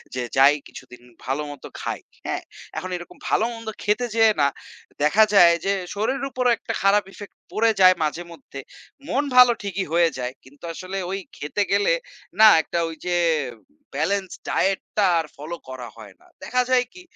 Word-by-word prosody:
যে 125 - -2 0.2
যাই 140 +2 +7
কিছুদিন 125 -2 -13 0.2
ভালো 135 +4 -1
মতো 145 - -10
খাই। - - -3 0.3
হ্যাঁ - - -3 0.3
এখন 185 +3 -4
এরকম 175 -1 -12
ভালো-মন্দ 230 0 -1 0.2
খেতে 215 +4 +1
যেয়ে 225 -1 +5
না, 140 - +5 0.6
দেখা 200 +9 +5
যায় 175 -3 +7
যে 200 - +2 0.2
শরীরের 260 +7 -1
উপরও 250 -1 +1
একটা - - -5
খারাপ 200 +1 +4
ইফেক্ট 205 - -11 0.2
পড়ে 225 +1 +3
যায় 185 0 +8
মাঝে 160 +3 -2
মধ্যে। 140 -3 -11 0.5
মন 280 +3 +1
ভালো 250 -1 +9
ঠিকই 195 -1 -3
হয়ে 170 -1 +4
যায়। 125 0 -3
কিন্তু 140 +4 -20
আসলে 185 +3 -6
ঐ - - -4 0.3
খেতে 150 +8 -3
গেলে 205 - +3 0.5
না 220 - +10
একটা 170 - -3
ওই 165 - -7
যে, 175 -1 0 0.8
বেলেন্স 200 -2 0 0.2
ডায়েটটা 195 +1 0
আর 165 - -2
ফলো 155 +4 -6
করা 130 -2 -7
হয় 105 -4 -12
না। - - -23 0.2
দেখা 250 +1 +1
যায় 250 -1 +3
কি 360 - -12
185 Hz, 170 wpm, -23 LUFS, 150-220 Hz, 0.8 s, না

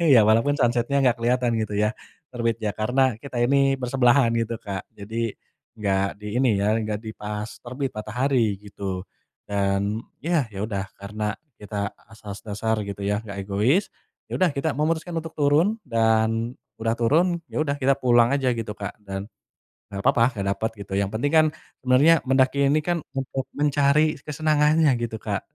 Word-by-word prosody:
ya, 110 -3 +7
walaupun 115 +7 +3
sunset-nya 120 +2 +1
nggak 125 -1 +4
keliatan 120 0 +2
gitu 110 -2 -2
ya, 105 +3 +1 0.4
terbit. 115 -1 0
Ya, 105 -2 -2
karena 125 +3 +2
kita 135 -3 -5
ini 135 +2 +3
bersebelahan 125 -1 +3
gitu, 115 -1 -1
Kak, 95 -2 -5
jadi 110 +2 -4 0.4
nggak 100 -1 0
di 105 - -9
ini 130 0 +3
ya, 105 +2 +2
nggak 105 -1 -2
di 110 - -6
pas 105 0 -5
terbit 130 +2 -4
matahari 115 +1 0
gitu, 100 -2 -5 0.5
dan 100 +1 0 0.3
yah, 165 -6 +1
ya 95 - -3
udah 100 -3 -3
karena 105 +1 -4 0.3
kita 100 -1 -3 0.2
asas 105 -2 -9
dasar 110 +2 -1
gitu 100 0 -6
ya, 105 +1 +1
gak 100 -1 -5
egois, 115 - +1 0.4
ya - - -2
udah 185 - +5
kita 140 +3 0
memutuskan 160 +4 -1
untuk 160 0 -9
turun. 155 +9 +3
Dan 115 0 +1 0.3
udah 115 0 +1
turun, 165 +10 +2
ya - - -2
udah 145 -2 0
kita 135 -1 +3
pulang 120 -2 +4
aja 135 -2 +1
gitu, 115 -1 -4
Kak, 105 -2 -6
dan 95 0 -5 0.7
nggak 100 - -4
papa 115 - +4
nggak 100 - -2
dapet 110 +3 -2
gitu, 95 - -13
yang 100 - +1
penting 125 +6 0
kan 155 -1 +6 0.3
sebenernya 140 +6 +5
mendaki 135 +1 +3
ini 150 - +3
kan 175 0 0 0.2
untuk 135 0 -2
mencari 145 +1 +3
kesenangannya 150 +1 +2
gitu, 115 -1 -3
Kak, - - -2
115 Hz, 170 wpm, -24 LUFS, 105-140 Hz, 0.7 s, ya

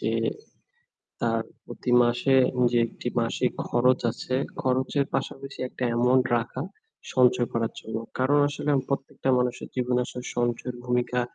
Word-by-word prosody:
যে - - 0 1.1
তার 115 -1 +1 0.2
প্রতি 125 - -5
মাসে 120 +3 +2 0.4
যে 120 - +4
একটি - - -6
মাসিক - - 0 0.2
খরচ 125 +1 +4
আছে, 130 - -5 0.3
খরচের 130 +2 +1
পাশাপাশি 135 +1 -4
একটা 130 - -8
অ্যামাউন্ট 125 +2 +3
রাখা 120 +3 -3 0.5
সঞ্চয় 125 -1 +4
করার 115 -1 -1
জন্য। 110 0 -6 0.2
কারণ 135 +3 +3
আসলে 145 +1 -3 0.2
প্রত্যেকটা 135 -1 -3
মানুষের 125 -1 -1
জীবনে 125 -1 +1
আসলে 125 - -7
সঞ্চয়ের 120 +1 -1
ভূমিকা 125 0 0
125 Hz, 130 wpm, -26 LUFS, 120-130 Hz, 1.1 s, যে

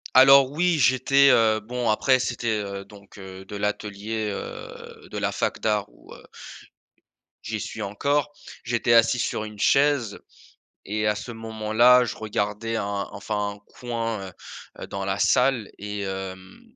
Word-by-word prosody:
Alors 135 +1 +8
oui, 175 +2 +1
j'étais 135 +2 +4
heu, 110 -3 +4
bon 120 +2 -3
après 130 +4 +3
c'était, 120 -1 -3
heu, 100 -2 -3
donc 100 0 -16
heu, 95 0 -10
de 105 - -9
l'atelier, 105 +1 -3
heu, - - -9
de - - -5
la - - -1
fac - - -2
d'art 105 -2 0
où - - -19
heu - - -15 1.2
j'y 110 -1 -4
suis 110 - -6
encore. 140 +9 -1 0.3
J'étais 120 0 +1
assis 115 +1 +4
sur 110 - -2
une 105 -1 -9
chaise 140 -6 +2 0.7
et 105 +1 -1
à 105 - +2
ce 120 +3 -7
moment-là, 115 +2 +3
je 120 - -4
regardais 110 +1 -3
un 100 -2 -3
enfin 105 +1 -3
un 100 - -16 0.2
coin, 115 -5 -3
heu 90 - -12 0.5
heu, - - -5
dans 100 0 -5
la 95 +1 -1
salle 125 -2 +2
et 105 0 -5
hem, 95 -1 -7
110 Hz, 160 wpm, -24 LUFS, 100-120 Hz, 1.2 s, Alors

